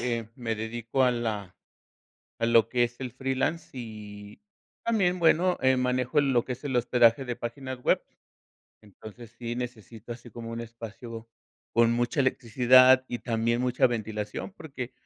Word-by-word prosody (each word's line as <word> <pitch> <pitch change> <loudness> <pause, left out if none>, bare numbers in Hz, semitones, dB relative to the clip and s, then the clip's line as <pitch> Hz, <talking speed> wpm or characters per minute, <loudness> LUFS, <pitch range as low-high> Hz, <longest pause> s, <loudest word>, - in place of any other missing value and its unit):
eh, 115 -2 -2
me 115 -3 -2
dedico 115 +4 -2
a 125 - +5
la 110 -6 -3 0.9
a 115 - +1
lo 115 -1 +4
que 120 0 +2
es 120 0 -10
el 125 - -4
freelance 135 +7 -2
y 105 - -9 0.4
también, 190 -6 +1
bueno, 175 +2 +3
eh, 130 0 +4
manejo 125 +3 +1
lo 130 -4 +2
que 125 - -3
es 125 - -12
el 135 -3 -2
hospedaje 120 +1 +4
de 120 -2 -3
páginas 130 +1 -6
web. - - +3 0.8
Entonces 110 +3 -13
sí 120 -1 -4
necesito 120 -2 -7
así 120 0 -9
como, 115 0 -8
un 115 - -5
espacio 115 0 -9 0.4
con 115 0 +4
mucha 120 +4 0
electricidad 130 0 +5
y 120 - -4
también 115 0 0
mucha 125 0 +2
ventilación, 110 - -4
porque 140 - -7
120 Hz, 155 wpm, -27 LUFS, 115-130 Hz, 0.9 s, a